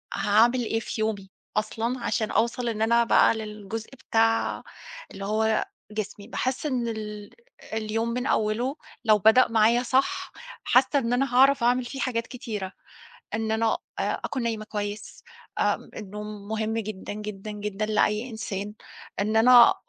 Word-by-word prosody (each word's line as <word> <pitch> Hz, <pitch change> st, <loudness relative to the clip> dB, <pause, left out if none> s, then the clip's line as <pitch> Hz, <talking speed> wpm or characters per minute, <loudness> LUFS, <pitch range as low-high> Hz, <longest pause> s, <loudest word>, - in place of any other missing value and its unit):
هاعمل 225 Hz, +5 st, +3 dB
إيه 225 Hz, +1 st, 0 dB
في 220 Hz, -, -5 dB
يومي، 200 Hz, -3 st, -2 dB, 0.3 s
أصلًا 230 Hz, +4 st, -1 dB
عشان 220 Hz, -3 st, 0 dB
أوصل 235 Hz, +1 st, +1 dB
إن 220 Hz, -1 st, -3 dB
أنا 235 Hz, +1 st, +4 dB
بقى 230 Hz, -, +5 dB
للجزء 215 Hz, 0 st, -6 dB, 0.2 s
بتاع 225 Hz, 0 st, +2 dB, 0.5 s
اللي 195 Hz, 0 st, -7 dB
هو 220 Hz, +1 st, +1 dB, 0.3 s
جسمي 210 Hz, -1 st, -5 dB
باحس 260 Hz, +4 st, -2 dB
إن 250 Hz, -5 st, 0 dB
ال 210 Hz, -2 st, -6 dB, 0.4 s
اليوم 220 Hz, +1 st, -1 dB
من 250 Hz, +2 st, -2 dB
أوّله 230 Hz, +6 st, 0 dB, 0.3 s
لو 215 Hz, -1 st, +6 dB
بدأ 220 Hz, +6 st, +6 dB
معايا 230 Hz, +2 st, +3 dB
صح، 260 Hz, +3 st, 0 dB, 0.3 s
حاسّة 260 Hz, +2 st, +4 dB
إن 240 Hz, -1 st, -1 dB
أنا 260 Hz, 0 st, 0 dB
هاعرف 270 Hz, -1 st, +5 dB
أعمل 245 Hz, +1 st, +3 dB
فيه 270 Hz, +2 st, -6 dB
حاجات 230 Hz, -3 st, -1 dB
كتيرة، 210 Hz, -6 st, -5 dB, 0.6 s
إن 220 Hz, 0 st, -1 dB
أنا 225 Hz, 0 st, +1 dB, 0.2 s
آآ، -, -, -1 dB
أكون 260 Hz, -4 st, -2 dB
نايمة 225 Hz, -2 st, -2 dB
كويس 210 Hz, 0 st, -5 dB, 0.4 s
آمم، -, -, 0 dB
النوم 210 Hz, 0 st, -7 dB
مهم 220 Hz, 0 st, -1 dB
جدًا، 210 Hz, -3 st, -5 dB
جدًا، 210 Hz, 0 st, -6 dB
جدًا 210 Hz, 0 st, -3 dB
لأي 215 Hz, +3 st, +1 dB
إنسان، 210 Hz, -2 st, -5 dB, 0.5 s
إن 215 Hz, +2 st, 0 dB
أنا 240 Hz, +1 st, +8 dB
220 Hz, 150 wpm, -26 LUFS, 210-240 Hz, 0.6 s, أنا